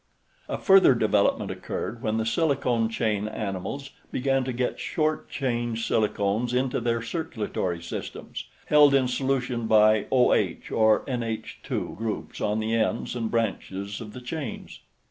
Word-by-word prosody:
A - - -1
further 190 -9 +6
development 105 -3 +2
occurred 115 +1 -5
when 110 -3 0
the 110 - 0
silicone 125 -5 +1
chain 110 -2 -1
animals 110 +6 -4 0.2
began 135 0 +1
to 130 - -2
get 125 0 -2
short 155 -1 -1
chain 120 -4 -1
silicones 110 +1 0
into 130 0 +1
their 115 -1 0
circulatory 110 - -3
systems, 85 - -6 0.2
held 145 -2 +6
in 130 -2 +3
solution 125 -2 -1
by 110 -1 +5
OH 130 -2 +3 0.2
or 110 -1 +4
NH_ 115 -4 -4
groups 110 0 -4
on 105 +1 0
the 110 +1 -1
ends 115 +2 0
and 115 -2 -2
branches 100 -3 -2
of 105 -2 -8
the 125 - -8
chains. 135 -1 -6
115 Hz, 140 wpm, -26 LUFS, 110-130 Hz, 0.2 s, further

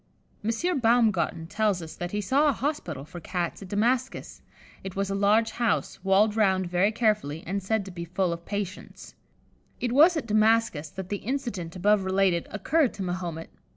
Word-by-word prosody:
M. 275 +10 0
Baumgarten 225 -8 +2
tells 210 +1 0
us 160 -2 -8
that 175 - -4
he 210 +3 -2
saw 275 +9 +2
a - - +2
hospital 225 - -3
for 175 - -9
Cats 175 +1 -3
at 195 - -8
Damascus: 240 +6 -1 0.4
it 190 -1 -7
was 195 0 -1
a - - 0
large 210 +3 +3
house, 230 -4 -1
walled 200 +2 +3
round 190 -4 +2
very 180 +4 +2
carefully, 210 -9 0
and 195 +3 -2
said 205 +1 -1
to 195 - -8
be 170 -1 -6
full 180 0 -1
of 170 0 -8
patients. 200 -1 -6 0.7
It 245 - -1
was 315 +7 +6
at 285 - -3
Damascus 215 -8 +2
that 190 +3 -8
the 205 - -1
incident 210 -9 -4
above 200 +2 +3
related 190 -2 +1
occurred 270 - +1
to 200 - -4
Mahomet. 175 -3 -4
200 Hz, 180 wpm, -26 LUFS, 180-225 Hz, 0.7 s, was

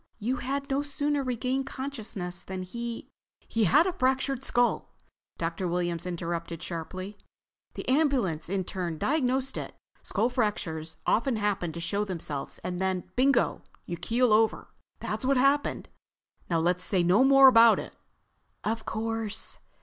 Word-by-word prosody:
You 240 +4 -1
had 275 +2 -3
no 275 +1 0
sooner 290 0 0
regained 255 +1 -1
consciousness 220 -11 -5
than 190 -1 -5
he—" 235 +5 -6 0.4
"He 225 -2 +1
had 300 - +5
a 375 - 0
fractured 265 -2 0
skull!" 245 -2 0 0.4
Dr. 170 +2 -2
Williams 175 0 -1
interrupted 170 -1 -4
sharply. 185 +4 -6 0.6
"The - - -6
ambulance 255 - +1
intern 180 -3 -2
diagnosed 265 - 0
it. - - -7 0.3
Skull 220 +4 0
fractures 165 -10 -2
often 230 0 +2
fail 205 -1 +2 0.2
to 170 - -7
show 200 +5 -1
themselves 160 -8 -4
and 180 0 -3
then—bingo, 190 +9 +1 0.2
you 170 - -4
keel 230 +7 +2
over. 220 +1 +2 0.3
That's - - -4
what 270 +1 +3
happened. 275 +3 +2 0.6
Now 165 -2 +2
let's 180 +2 +1
say 185 -3 +1
no 185 +8 +5
more 270 0 +8
about 230 -3 +7
it." - - -7 0.7
"Of 220 +1 -2
course." 220 -1 -3
220 Hz, 140 wpm, -28 LUFS, 180-260 Hz, 0.7 s, more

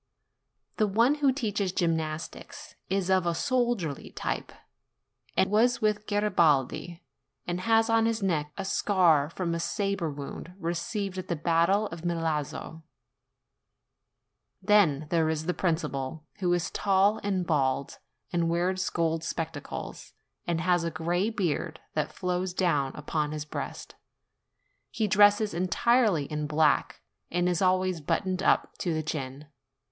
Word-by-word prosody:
The 215 - +3
one 230 +7 +3
who 275 -2 +5
teaches 210 -7 -1
gymnastics 165 - -3 0.2
is 190 -1 0
of 185 -2 +3
a 170 - +1
soldierly 240 - -1
type, - - -4 0.9
and 190 - +4
was 235 +4 +3
with 210 -1 0
Garibaldi, 170 -5 +1 0.4
and 175 0 -2
has 225 +2 +3
on 225 -1 +3
his 230 -2 -1
neck 150 -6 0
a 195 - -3
scar 175 -8 +3
from 170 0 -3
a 170 - -2
sabre 200 -2 -1
wound 145 +5 -8
received 190 +3 -3
at 185 - -7
the 170 - -1
battle 170 +6 +2
of 165 0 -8
Milazzo. 160 -2 -2 1.8
Then 185 -8 +3
there 165 -2 +2
is 160 0 -2
the 180 - 0
principal, 160 -5 -2
who 180 -2 +1
is 175 -2 0
tall 200 +1 +2
and 190 -3 -1
bald, 140 -4 0 0.3
and 170 -1 +1
wears 185 +3 0
gold 165 -1 0
spectacles, 165 -3 -5 0.3
and 170 -2 0
has 175 -1 +2
a 170 - 0
gray 170 +5 0
beard 170 -6 -2
that 155 0 -1
flows 180 +1 -2
down 150 -8 +1
upon 150 0 -2
his 150 -1 -4
breast; - - -6 1.0
he 220 -2 -1
dresses 205 +1 +5
entirely 185 - +2
in 150 0 -3
black, 150 -2 +2 0.3
and 175 +1 +1
is 180 -1 0
always 185 -2 +2
buttoned 185 +5 -1
up - - +2
to 170 -3 -1
the 155 - -1
chin. 140 -2 -5
175 Hz, 140 wpm, -28 LUFS, 160-200 Hz, 1.8 s, who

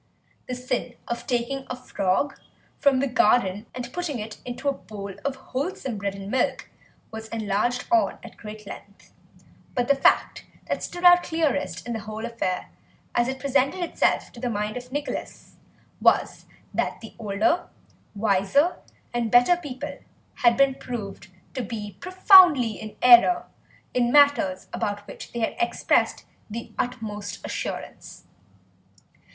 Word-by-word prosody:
The 250 - -3
sin 250 -1 -3
of 235 0 -4
taking 265 +1 -1
a 250 - -3
frog 250 0 -1 0.4
from 270 -2 +3
the 275 - +1
garden 215 -4 +2
and 245 -1 -6
putting 350 -7 -3
it 215 0 -7
into 245 +3 -5
a 280 - +3
bowl 200 -6 -8
of 280 -1 -1 0.2
wholesome 265 - -3
bread 200 0 -2
and 195 +1 -7
milk 255 -1 -1 0.4
was 220 0 -7
enlarged 225 +2 -1
on 345 -1 +3
at - - -11
great 215 -1 -10
length, 200 0 -12 0.6
but 245 -1 +1
the 280 - +6
fact 275 - +2 0.2
that - - -2
stood 355 - -6
out 355 0 +8
clearest 315 -4 -1
in 240 - -3
the 225 - -3
whole 215 +2 -6
affair, 230 -6 -3 0.4
as 240 0 +2
it 265 +1 -2
presented 275 +5 +1
itself 340 - 0
to 235 - -12
the 245 0 -2
mind 210 -1 -2
of 250 0 -7
Nicholas, 290 +1 -5 0.4
was - - +2 0.3
that - - -1
the 225 - -10
older, 220 - 0 0.5
wiser, 205 - +2 0.4
and 240 -2 0
better 245 +8 +6
people 290 -4 -7 0.4
had 235 -1 +4
been 275 -1 +4
proved 210 -8 -7 0.3
to 260 - -3
be 210 -3 -6
profoundly 365 - +6
in 215 0 -8
error 250 +8 +7 0.5
in 240 -1 +2
matters 285 -10 +4
about 205 0 -2
which - - -10
they 235 - -4
had 225 - -1
expressed 355 - +1 0.2
the 230 +2 -6
utmost 210 -4 -4
assurance. - - -6
245 Hz, 145 wpm, -25 LUFS, 215-275 Hz, 0.6 s, out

